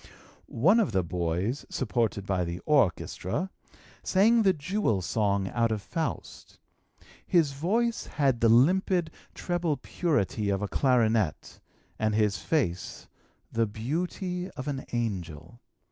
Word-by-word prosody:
One 185 Hz, -, +3 dB
of 205 Hz, -, +1 dB
the 95 Hz, -1 st, +2 dB
boys, 90 Hz, -, -2 dB
supported 110 Hz, -5 st, -1 dB
by 95 Hz, -2 st, 0 dB
the 85 Hz, 0 st, -4 dB
orchestra, 145 Hz, -, 0 dB, 0.5 s
sang 225 Hz, +5 st, +4 dB
the 195 Hz, -3 st, +5 dB
'Jewel 155 Hz, -, -1 dB
Song' 100 Hz, -1 st, 0 dB
out 115 Hz, -1 st, +1 dB
of 110 Hz, -, -1 dB
'Faust.' 160 Hz, -3 st, -5 dB, 0.7 s
His 165 Hz, -6 st, +2 dB
voice 220 Hz, +12 st, -1 dB
had 135 Hz, -5 st, 0 dB
the 115 Hz, -, +5 dB
limpid, 170 Hz, -, +3 dB, 0.2 s
treble 175 Hz, -4 st, -1 dB
purity 110 Hz, -, -1 dB
of 100 Hz, 0 st, 0 dB
a -, -, -1 dB
clarinet, 115 Hz, -, +1 dB, 0.4 s
and 110 Hz, -1 st, +1 dB
his 105 Hz, -2 st, +1 dB
face 95 Hz, -, -2 dB, 0.4 s
the 115 Hz, 0 st, +1 dB
beauty 180 Hz, -, -3 dB
of 130 Hz, -, -5 dB
an 135 Hz, -2 st, -3 dB
angel. 95 Hz, -5 st, -4 dB
120 Hz, 125 wpm, -28 LUFS, -, 0.7 s, the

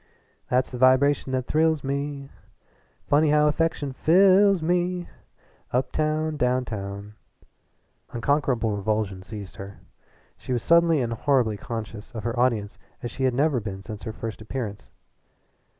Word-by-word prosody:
"That's 125 Hz, +1 st, +1 dB
the 125 Hz, -, -6 dB
vibration 130 Hz, +2 st, +4 dB
that 130 Hz, -1 st, -1 dB
thrills 160 Hz, 0 st, +1 dB
me, 140 Hz, 0 st, -4 dB, 0.8 s
Funny 150 Hz, +2 st, +4 dB
how 150 Hz, 0 st, +4 dB
affection 150 Hz, -3 st, 0 dB
fi 155 Hz, +5 st, 0 dB
lls 195 Hz, +1 st, +6 dB
me 175 Hz, +2 st, 0 dB, 0.6 s
Uptown, 155 Hz, +4 st, 0 dB
downtown 105 Hz, -6 st, -2 dB, 0.5 s
" -, -, -44 dB
Unconquerable 120 Hz, -3 st, 0 dB
revulsion 100 Hz, -2 st, -2 dB
seized 100 Hz, 0 st, -9 dB
her. 100 Hz, +1 st, -9 dB, 0.6 s
She 130 Hz, -, -5 dB
was 120 Hz, -, -1 dB
suddenly 170 Hz, -3 st, +4 dB
and 115 Hz, -1 st, -2 dB
horribly 120 Hz, -3 st, +1 dB
conscious 110 Hz, -1 st, -7 dB
of 110 Hz, -, -5 dB
her 120 Hz, +1 st, -2 dB
audience 115 Hz, -5 st, 0 dB, 0.2 s
as 120 Hz, -, -4 dB
she 135 Hz, -, -2 dB
had 130 Hz, -2 st, +1 dB
never 145 Hz, -1 st, +2 dB
been 100 Hz, -3 st, -6 dB
since 105 Hz, -1 st, -8 dB
her 110 Hz, -, -5 dB
first 110 Hz, 0 st, -7 dB
appearance. 110 Hz, -3 st, -6 dB
130 Hz, 140 wpm, -25 LUFS, 110-150 Hz, 0.8 s, lls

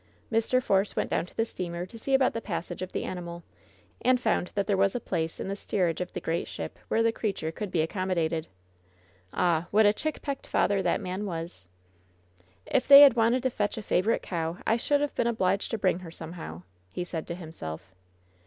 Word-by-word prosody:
Mr. 230 Hz, +3 st, +2 dB
Force 195 Hz, -1 st, +2 dB
went -, -, -1 dB
down 170 Hz, -, 0 dB
to -, -, -19 dB
the 225 Hz, -, +2 dB
steamer 175 Hz, -4 st, -5 dB
to 185 Hz, -, -14 dB
see 270 Hz, +4 st, +1 dB
about 265 Hz, -1 st, +3 dB
the 230 Hz, -, -3 dB
passage 175 Hz, -2 st, -4 dB
of 185 Hz, -, -4 dB
the -, -, -2 dB
animal, 175 Hz, -1 st, -6 dB, 0.6 s
and 255 Hz, 0 st, +4 dB
found 180 Hz, -6 st, 0 dB
that 200 Hz, -1 st, +1 dB
there 205 Hz, -, +2 dB
was 195 Hz, +2 st, +2 dB
a -, -, 0 dB
place 160 Hz, -7 st, -3 dB
in -, -, -4 dB
the 195 Hz, -, -2 dB
steerage 180 Hz, -5 st, -1 dB
of 180 Hz, -, -4 dB
the -, -, -3 dB
great 165 Hz, +1 st, -2 dB
ship -, -, -6 dB
where 225 Hz, -, +2 dB
the 230 Hz, -, +3 dB
creature 195 Hz, -8 st, -2 dB
could 205 Hz, +4 st, -5 dB
be 170 Hz, -, +1 dB
accommodated. 165 Hz, -2 st, -1 dB, 0.8 s
Ah, 175 Hz, -2 st, +1 dB
what 215 Hz, +1 st, +5 dB
a 205 Hz, -, +6 dB
chickpecked 285 Hz, +1 st, -4 dB
father 200 Hz, -1 st, +2 dB
that 180 Hz, -2 st, +1 dB
man 185 Hz, +3 st, -3 dB
was! 165 Hz, -, -6 dB, 1.0 s
"If 250 Hz, -, +1 dB
they 280 Hz, +1 st, +11 dB
had 285 Hz, -3 st, +9 dB
wanted 235 Hz, +2 st, +3 dB
to 260 Hz, -, +1 dB
fetch 205 Hz, -2 st, -1 dB
a 220 Hz, -, -5 dB
favorite 200 Hz, +4 st, +1 dB
cow, 165 Hz, -1 st, -3 dB
I 225 Hz, -, +3 dB
should 285 Hz, +5 st, +1 dB
have 290 Hz, -, -1 dB
been 235 Hz, -, +1 dB
obliged 200 Hz, -4 st, +1 dB
to 225 Hz, -, -1 dB
bring 185 Hz, -3 st, +1 dB
her 180 Hz, -2 st, -9 dB
somehow," 160 Hz, -, -8 dB, 0.3 s
he 180 Hz, -, -3 dB
said 165 Hz, -2 st, -5 dB
to 170 Hz, -, -4 dB
himself. 95 Hz, -, -8 dB
185 Hz, 210 wpm, -28 LUFS, 170-225 Hz, 1.0 s, they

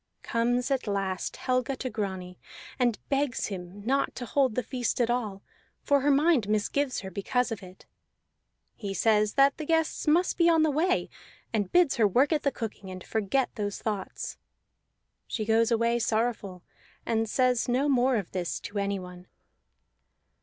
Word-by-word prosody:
Comes 245 Hz, +3 st, 0 dB
at 265 Hz, -4 st, 0 dB
last 195 Hz, -2 st, -2 dB
Helga 255 Hz, +1 st, 0 dB
to 260 Hz, -, -4 dB
Grani, 190 Hz, -5 st, -4 dB, 0.4 s
and 240 Hz, -3 st, +2 dB
begs 275 Hz, -3 st, 0 dB
him 190 Hz, +1 st, -8 dB
not 275 Hz, +3 st, +1 dB
to 245 Hz, -, -5 dB
hold 260 Hz, -2 st, +1 dB
the 250 Hz, -, 0 dB
feast 250 Hz, 0 st, -2 dB
at 240 Hz, -1 st, +2 dB
all, 215 Hz, -5 st, -2 dB, 0.4 s
for 285 Hz, -1 st, +3 dB
her 290 Hz, -, +2 dB
mind 285 Hz, -6 st, +3 dB
misgives 250 Hz, +6 st, 0 dB
her 190 Hz, -1 st, -7 dB
because 245 Hz, +5 st, -1 dB
of 220 Hz, -, -4 dB
it. 185 Hz, 0 st, -13 dB, 0.9 s
He 200 Hz, -3 st, -5 dB
says 215 Hz, -1 st, +2 dB
that 275 Hz, 0 st, +4 dB
the -, -, -3 dB
guests 325 Hz, -1 st, 0 dB
must 345 Hz, +5 st, +2 dB
be 340 Hz, 0 st, +5 dB
on 325 Hz, -2 st, +4 dB
the 310 Hz, -, +3 dB
way, 345 Hz, +6 st, +1 dB, 0.5 s
and 205 Hz, -4 st, -1 dB
bids 350 Hz, -5 st, +4 dB
her 220 Hz, -3 st, +5 dB
work 260 Hz, -, +3 dB
at 300 Hz, -, +1 dB
the 280 Hz, -, +1 dB
cooking, 210 Hz, -5 st, -6 dB
and 185 Hz, -1 st, -8 dB
forget 220 Hz, +5 st, 0 dB
those 205 Hz, -3 st, -3 dB
thoughts. 205 Hz, -4 st, -4 dB, 0.9 s
She 215 Hz, -, -3 dB
goes 225 Hz, +1 st, +3 dB
away 235 Hz, 0 st, +2 dB
sorrowful, 220 Hz, -5 st, -1 dB, 0.4 s
and 225 Hz, -1 st, 0 dB
says 250 Hz, -1 st, +2 dB
no 260 Hz, +4 st, +2 dB
more 260 Hz, -2 st, +3 dB
of 200 Hz, -6 st, -3 dB
this 180 Hz, -2 st, -3 dB
to 205 Hz, 0 st, -4 dB
anyone. 185 Hz, -2 st, -4 dB
230 Hz, 165 wpm, -28 LUFS, 205-270 Hz, 0.9 s, be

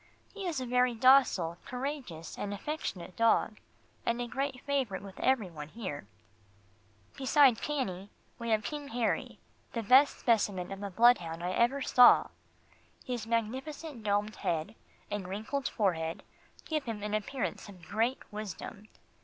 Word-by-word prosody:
He 400 Hz, -3 st, -5 dB
is 320 Hz, -6 st, -1 dB
a 255 Hz, -, -3 dB
very 250 Hz, 0 st, +2 dB
docile, 225 Hz, -9 st, +4 dB
courageous 250 Hz, -, -5 dB
and 205 Hz, 0 st, -4 dB
affectionate 200 Hz, -, -5 dB
dog, 225 Hz, -1 st, +2 dB, 0.4 s
and 235 Hz, +1 st, 0 dB
a 245 Hz, -, -1 dB
great 265 Hz, +2 st, -3 dB
favourite 265 Hz, -10 st, -1 dB
with 195 Hz, -1 st, -11 dB
every 235 Hz, -8 st, +1 dB
one 150 Hz, -2 st, -7 dB
here. 155 Hz, -, -6 dB, 1.1 s
Beside 270 Hz, -2 st, +4 dB
Cannie, 205 Hz, -10 st, -3 dB, 0.3 s
we 235 Hz, 0 st, -4 dB
have 215 Hz, -1 st, +2 dB
King 290 Hz, +5 st, -5 dB
Harry, 235 Hz, -3 st, -1 dB, 0.4 s
the 230 Hz, -, -2 dB
best 260 Hz, +6 st, +6 dB
specimen 200 Hz, -6 st, +1 dB
of 195 Hz, 0 st, -6 dB
a 200 Hz, -, -4 dB
bloodhound 180 Hz, -6 st, +3 dB
I 180 Hz, -, -1 dB
ever 245 Hz, +7 st, +2 dB
saw. 250 Hz, -1 st, +7 dB, 0.8 s
His 240 Hz, -3 st, -4 dB
magnificent 260 Hz, +4 st, -3 dB
domed 205 Hz, 0 st, 0 dB
head, 165 Hz, +5 st, -2 dB, 0.4 s
and 205 Hz, -3 st, -3 dB
wrinkled 220 Hz, +9 st, -3 dB
forehead 165 Hz, -6 st, -1 dB, 0.4 s
give 310 Hz, -3 st, -2 dB
him 220 Hz, -3 st, -5 dB
an 210 Hz, 0 st, -3 dB
appearance 215 Hz, +1 st, -3 dB
of 185 Hz, -4 st, -13 dB
great 230 Hz, +6 st, +1 dB, 0.2 s
wisdom. 210 Hz, 0 st, -7 dB
225 Hz, 145 wpm, -31 LUFS, 195-260 Hz, 1.1 s, saw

